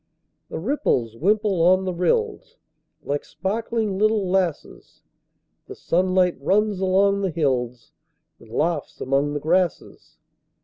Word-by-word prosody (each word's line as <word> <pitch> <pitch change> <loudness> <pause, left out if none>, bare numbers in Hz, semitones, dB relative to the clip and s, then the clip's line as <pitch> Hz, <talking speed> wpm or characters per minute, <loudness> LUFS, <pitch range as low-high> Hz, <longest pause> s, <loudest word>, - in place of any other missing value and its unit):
The - - -5
ripples 160 - -1
wimple 200 - +1
on 185 +2 +4
the 185 - -2
rills, 425 - -1 0.5
Like 145 +1 -2
sparkling 205 +5 -3
little 215 -2 +2
lasses; 180 -4 -3 0.6
The - - -9
sunlight 185 0 +1
runs 205 +5 +1
along 195 +1 +2
the 195 - 0
hills, 125 -7 -2 0.5
And 115 - -17
laughs 155 +6 -2
among 140 +2 0
the - - -1
grasses. 175 +2 -1
185 Hz, 120 wpm, -23 LUFS, 150-200 Hz, 0.6 s, on